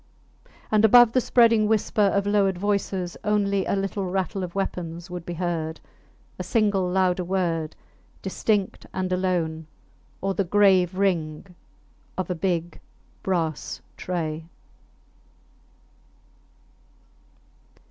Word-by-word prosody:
And 215 Hz, 0 st, +4 dB
above 240 Hz, +1 st, +7 dB
the 255 Hz, -, +2 dB
spreading 230 Hz, -3 st, +4 dB
whisper 215 Hz, 0 st, +1 dB
of 200 Hz, 0 st, +3 dB
lowered 200 Hz, -2 st, +2 dB
voices 195 Hz, -2 st, -1 dB
only 200 Hz, -2 st, +1 dB
a -, -, +1 dB
little 195 Hz, 0 st, -2 dB
rattle 190 Hz, 0 st, -2 dB
of 175 Hz, 0 st, -6 dB
weapons 175 Hz, -2 st, -4 dB
would 175 Hz, -2 st, -6 dB
be 175 Hz, -, -4 dB
heard, 165 Hz, -2 st, -2 dB, 0.6 s
a -, -, -2 dB
single 205 Hz, -5 st, +1 dB
louder 185 Hz, 0 st, +1 dB
word 170 Hz, -4 st, -1 dB, 0.5 s
distinct 200 Hz, +1 st, -1 dB
and 185 Hz, -1 st, -1 dB
alone, 170 Hz, -4 st, -1 dB, 0.5 s
or 195 Hz, 0 st, -1 dB
the 195 Hz, -, 0 dB
grave 185 Hz, -1 st, +3 dB
ring 180 Hz, -2 st, -1 dB, 0.6 s
of 185 Hz, -1 st, -2 dB
a -, -, +2 dB
big 175 Hz, -1 st, -2 dB, 0.4 s
brass 165 Hz, -5 st, -2 dB, 0.2 s
tray. 160 Hz, -3 st, -3 dB
185 Hz, 110 wpm, -25 LUFS, 175-200 Hz, 0.6 s, above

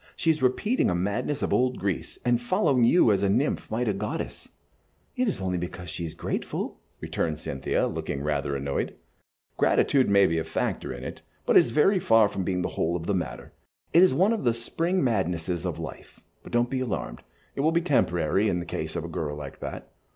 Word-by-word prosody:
She 165 Hz, -, +2 dB
is 155 Hz, -, -2 dB
repeating 205 Hz, -, +2 dB
a 90 Hz, -, +1 dB
madness 120 Hz, +11 st, -1 dB
of -, -, 0 dB
old 125 Hz, 0 st, +2 dB
Greece, 95 Hz, -4 st, -3 dB
and 120 Hz, -1 st, +2 dB
following 140 Hz, -, +2 dB
you 120 Hz, -1 st, +5 dB
as 100 Hz, -2 st, +2 dB
a 100 Hz, -, +2 dB
nymph 100 Hz, -, 0 dB
might 120 Hz, +2 st, -1 dB
a 105 Hz, -, +2 dB
goddess." 105 Hz, +2 st, -5 dB, 0.7 s
"It 250 Hz, 0 st, +1 dB
is 205 Hz, -, -1 dB
only 90 Hz, -2 st, -1 dB
because 90 Hz, -1 st, -6 dB
she 85 Hz, -, -4 dB
is 80 Hz, -, -7 dB
grateful," -, -, -4 dB, 0.2 s
returned 80 Hz, -2 st, -2 dB
Cynthia, 70 Hz, -3 st, -1 dB
looking 70 Hz, -, -3 dB
rather 70 Hz, -2 st, -1 dB
annoyed. 70 Hz, 0 st, -2 dB, 0.6 s
"Gratitude 135 Hz, -5 st, +3 dB
may 100 Hz, -1 st, +6 dB
be 80 Hz, -2 st, +1 dB
a -, -, -1 dB
factor -, -, -2 dB
in -, -, -7 dB
it, -, -, -7 dB, 0.2 s
but -, -, +2 dB
it -, -, +11 dB
is -, -, +2 dB
very 170 Hz, -, +3 dB
far 115 Hz, -8 st, +5 dB
from 95 Hz, -, -3 dB
being 90 Hz, -1 st, -1 dB
the -, -, -1 dB
whole 85 Hz, +2 st, -1 dB
of 85 Hz, -1 st, -4 dB
the 100 Hz, -, 0 dB
matter. 90 Hz, -2 st, -4 dB, 0.4 s
It 170 Hz, -, +7 dB
is 185 Hz, -, +6 dB
one 195 Hz, +5 st, +3 dB
of 225 Hz, -, -2 dB
the 120 Hz, -2 st, +2 dB
spring 165 Hz, +10 st, -1 dB
madnesses 90 Hz, -7 st, -1 dB
of -, -, -3 dB
life; -, -, -9 dB, 0.2 s
but -, -, -12 dB
don't 120 Hz, +1 st, +1 dB
be 130 Hz, -, 0 dB
alarmed, 100 Hz, -, -3 dB, 0.3 s
it -, -, -1 dB
will 155 Hz, +3 st, +3 dB
be 170 Hz, +1 st, +2 dB
temporary 100 Hz, -, +2 dB
in 90 Hz, -, 0 dB
the 85 Hz, -, -4 dB
case -, -, -4 dB
of -, -, -2 dB
a -, -, -4 dB
girl 75 Hz, -2 st, -3 dB
like 70 Hz, -2 st, -8 dB
that. -, -, -7 dB
105 Hz, 215 wpm, -26 LUFS, 85-135 Hz, 0.7 s, it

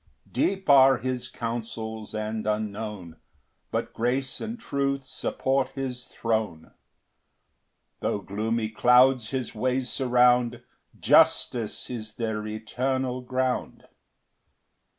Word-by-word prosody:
2 -, -, -27 dB
Deep 195 Hz, -1 st, 0 dB
are 135 Hz, -2 st, +7 dB
his 125 Hz, 0 st, -3 dB
counsels 110 Hz, -2 st, -5 dB
and 110 Hz, 0 st, -3 dB
unknown; 105 Hz, -5 st, -3 dB, 0.5 s
But -, -, -3 dB
grace 130 Hz, +3 st, -1 dB
and 230 Hz, +2 st, -5 dB
truth 140 Hz, -5 st, -1 dB
support 135 Hz, 0 st, -1 dB
his 130 Hz, -2 st, -4 dB
throne: 110 Hz, -8 st, -2 dB, 1.3 s
Tho' -, -, -1 dB
gloomy 110 Hz, +3 st, -2 dB
clouds 125 Hz, +1 st, +4 dB
his 130 Hz, -3 st, -3 dB
ways 125 Hz, +2 st, -1 dB
surround, 125 Hz, -2 st, +3 dB, 0.4 s
Justice 115 Hz, -4 st, +3 dB
is 110 Hz, -3 st, -6 dB
their 110 Hz, -2 st, -3 dB
eternal 125 Hz, +4 st, -2 dB
ground. 130 Hz, 0 st, -2 dB
120 Hz, 100 wpm, -26 LUFS, 110-130 Hz, 1.3 s, are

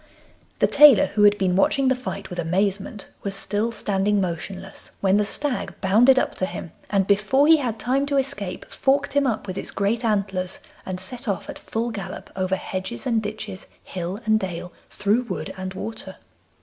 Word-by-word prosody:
The -, -, +4 dB
tailor, 285 Hz, -7 st, +8 dB
who 210 Hz, -, +1 dB
had 205 Hz, 0 st, +6 dB
been 185 Hz, -2 st, +1 dB
watching 265 Hz, +8 st, +3 dB
the 260 Hz, -, +5 dB
fight 200 Hz, -6 st, -6 dB
with 180 Hz, -, -5 dB
amazement, 195 Hz, +4 st, -1 dB, 0.2 s
was 195 Hz, -1 st, -2 dB
still 210 Hz, +3 st, 0 dB
standing 205 Hz, -1 st, +1 dB
motionless 185 Hz, +1 st, -4 dB
when 195 Hz, 0 st, +3 dB
the 210 Hz, -, +2 dB
stag 265 Hz, +5 st, -2 dB
bounded 225 Hz, +8 st, +5 dB
up -, -, +1 dB
to 185 Hz, -, 0 dB
him, 170 Hz, -, -7 dB, 0.2 s
and 195 Hz, -2 st, +2 dB
before 210 Hz, +8 st, +3 dB
he 320 Hz, +1 st, +7 dB
had 245 Hz, -6 st, -2 dB
time 260 Hz, +6 st, 0 dB
to 280 Hz, -1 st, +1 dB
escape 260 Hz, -9 st, -2 dB
forked 275 Hz, +1 st, +1 dB
him 285 Hz, -1 st, +3 dB
up 220 Hz, -4 st, -1 dB
with 190 Hz, -1 st, -4 dB
its -, -, -5 dB
great 215 Hz, +4 st, 0 dB
antlers, 195 Hz, -4 st, -1 dB, 0.3 s
and 185 Hz, -1 st, -3 dB
set 235 Hz, +6 st, -5 dB
off 200 Hz, -3 st, -2 dB
at -, -, -11 dB
full 230 Hz, +1 st, -3 dB
gallop 200 Hz, -4 st, -7 dB
over 185 Hz, 0 st, 0 dB
hedges 190 Hz, +7 st, -5 dB
and 230 Hz, -4 st, +2 dB
ditches, 210 Hz, -2 st, -6 dB, 0.2 s
hill 180 Hz, +2 st, -5 dB
and 220 Hz, 0 st, +4 dB
dale, 180 Hz, -2 st, -5 dB, 0.2 s
through 205 Hz, +4 st, +1 dB
wood 185 Hz, -, -4 dB
and 185 Hz, 0 st, -6 dB
water. 225 Hz, +4 st, -5 dB
205 Hz, 190 wpm, -23 LUFS, 190-235 Hz, 0.3 s, tailor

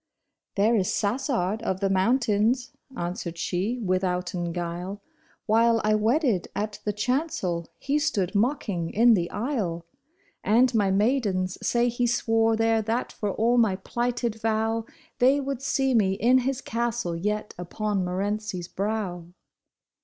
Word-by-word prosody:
'^ -, -, -58 dB
There 215 Hz, +4 st, +3 dB
is 190 Hz, -4 st, +1 dB
Sassard 220 Hz, -, -1 dB
of 190 Hz, -4 st, -2 dB
the 195 Hz, -, +1 dB
Mountains," 225 Hz, +4 st, +2 dB, 0.3 s
answered 175 Hz, -1 st, -4 dB
she 190 Hz, +8 st, -1 dB
withouten 180 Hz, -4 st, -1 dB
guile, 175 Hz, +3 st, -4 dB, 0.2 s
" -, -, -36 dB
While 230 Hz, +1 st, +4 dB
I 215 Hz, 0 st, +3 dB
wedded 225 Hz, -, +1 dB
at 210 Hz, 0 st, -3 dB
the 210 Hz, -, +1 dB
chancel, 210 Hz, -, -1 dB
he 285 Hz, +2 st, 0 dB
stood 210 Hz, -, 0 dB
mocking 205 Hz, -, 0 dB
in 235 Hz, +5 st, +5 dB
the 175 Hz, -4 st, +1 dB
aisle; 205 Hz, -, -2 dB, 0.6 s
And 240 Hz, +5 st, +4 dB
my 205 Hz, -4 st, +2 dB
maidens 195 Hz, -3 st, +1 dB
say 240 Hz, 0 st, +2 dB
he 240 Hz, 0 st, 0 dB
swore 225 Hz, -1 st, +2 dB
there 225 Hz, 0 st, +2 dB
that 225 Hz, +3 st, -2 dB
for 210 Hz, -, -3 dB
all 235 Hz, +4 st, +2 dB
my 220 Hz, -5 st, +3 dB
plighted 235 Hz, +2 st, -2 dB
vow, 225 Hz, 0 st, 0 dB, 0.3 s
They 265 Hz, +3 st, +5 dB
would 275 Hz, -2 st, -3 dB
see 270 Hz, -1 st, +1 dB
me 200 Hz, -5 st, +3 dB
in 245 Hz, +6 st, +4 dB
his 265 Hz, +1 st, -2 dB
castle 235 Hz, -8 st, -2 dB
yet 210 Hz, +5 st, -2 dB
upon 200 Hz, +2 st, -2 dB
Morency's 195 Hz, 0 st, -3 dB
brow." 195 Hz, -4 st, -3 dB
215 Hz, 145 wpm, -26 LUFS, 190-240 Hz, 0.6 s, in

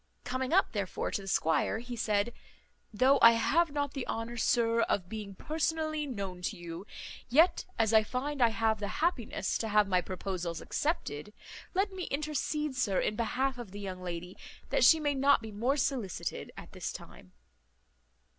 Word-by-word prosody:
Coming 255 Hz, +1 st, -2 dB
up, 385 Hz, +3 st, +4 dB
therefore, 200 Hz, -4 st, -2 dB
to -, -, -2 dB
the 195 Hz, -, -10 dB
squire, 165 Hz, +2 st, +1 dB
he 240 Hz, +1 st, -6 dB
said, 215 Hz, 0 st, 0 dB, 0.6 s
"Though 260 Hz, +5 st, +4 dB
I 230 Hz, 0 st, +9 dB
have 325 Hz, +9 st, +2 dB
not 285 Hz, -1 st, -2 dB
the 270 Hz, -3 st, -4 dB
honour, 225 Hz, +1 st, -3 dB
sir, 230 Hz, 0 st, +2 dB
of 185 Hz, -5 st, 0 dB
being 210 Hz, -2 st, -6 dB
personally 310 Hz, +2 st, -1 dB
known 195 Hz, -7 st, -5 dB
to 190 Hz, +2 st, -3 dB
you, 175 Hz, +3 st, -8 dB, 0.4 s
yet, 320 Hz, +9 st, +4 dB
as 225 Hz, -1 st, +2 dB
I 220 Hz, -, +7 dB
find 260 Hz, +6 st, -3 dB
I 235 Hz, -, +6 dB
have 220 Hz, -1 st, +1 dB
the 205 Hz, -, -2 dB, 0.2 s
happiness 305 Hz, -10 st, 0 dB
to 225 Hz, -, -2 dB
have 210 Hz, -1 st, +4 dB
my 185 Hz, -2 st, +2 dB
proposals 180 Hz, -2 st, -4 dB
accepted, 210 Hz, -, -2 dB, 0.4 s
let 390 Hz, +2 st, +2 dB
me 375 Hz, -2 st, -5 dB
intercede, 300 Hz, 0 st, -2 dB
sir, 205 Hz, -7 st, +1 dB
in 210 Hz, -, 0 dB
behalf 255 Hz, +3 st, -1 dB
of 235 Hz, -5 st, -7 dB
the 200 Hz, +2 st, -8 dB
young 190 Hz, -2 st, -6 dB
lady, 180 Hz, 0 st, -6 dB, 0.4 s
that -, -, +3 dB
she 320 Hz, -, +7 dB
may 290 Hz, -2 st, +1 dB
not 280 Hz, +1 st, +4 dB
be 220 Hz, -1 st, -8 dB
more 240 Hz, +7 st, 0 dB
solicited 255 Hz, -, -2 dB
at -, -, -10 dB
this -, -, -4 dB
time." 90 Hz, -, -12 dB
230 Hz, 175 wpm, -31 LUFS, 200-280 Hz, 0.6 s, I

